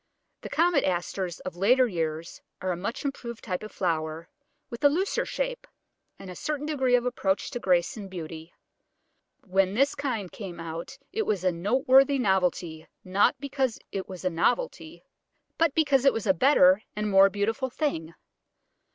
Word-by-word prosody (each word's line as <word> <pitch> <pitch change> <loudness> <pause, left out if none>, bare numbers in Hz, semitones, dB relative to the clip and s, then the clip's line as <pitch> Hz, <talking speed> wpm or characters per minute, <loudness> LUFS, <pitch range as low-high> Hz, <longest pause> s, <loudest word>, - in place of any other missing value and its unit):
The - - -7
Comet 335 -3 +2
Asters 180 0 -2
of 185 - -6
later 245 +8 +4
years 165 -3 -4 0.2
are 185 - -2
a - - -1
much 200 - -5
improved 235 -4 -5
type 180 -5 -3
of 215 - -8
flower, 160 -2 -2 0.4
with 235 - -8
a 285 - +8
looser 365 +7 -1
shape - - -3 0.5
and 195 - -11
a 180 - -8
certain 295 +5 -3
degree 265 -5 +2
of 245 0 +1
approach 200 -6 -1
to 245 - -4
grace 180 -5 +1
and 205 -3 -8
beauty. 165 -2 -8 0.9
When 195 0 +1
this 275 +4 +3
kind 235 -10 -3
came 185 -6 -8
out 165 +9 -6 0.2
it 440 0 -1
was 195 -4 0
a 185 - +3
noteworthy 260 +9 +3
novelty, 180 -7 0 0.2
not 190 +2 +3
because 270 -3 -1
it 195 -1 -5
was 185 -1 -8
a 185 - +1
novelty, 480 - -1 0.6
but 325 -3 +2
because 280 -5 +3
it 275 - +5
was 225 - -3
a 190 - +4
better 185 - +5
and 210 0 -2
more 195 -1 +6
beautiful 225 +7 -1
thing. 170 - -3
200 Hz, 170 wpm, -27 LUFS, 180-270 Hz, 0.9 s, a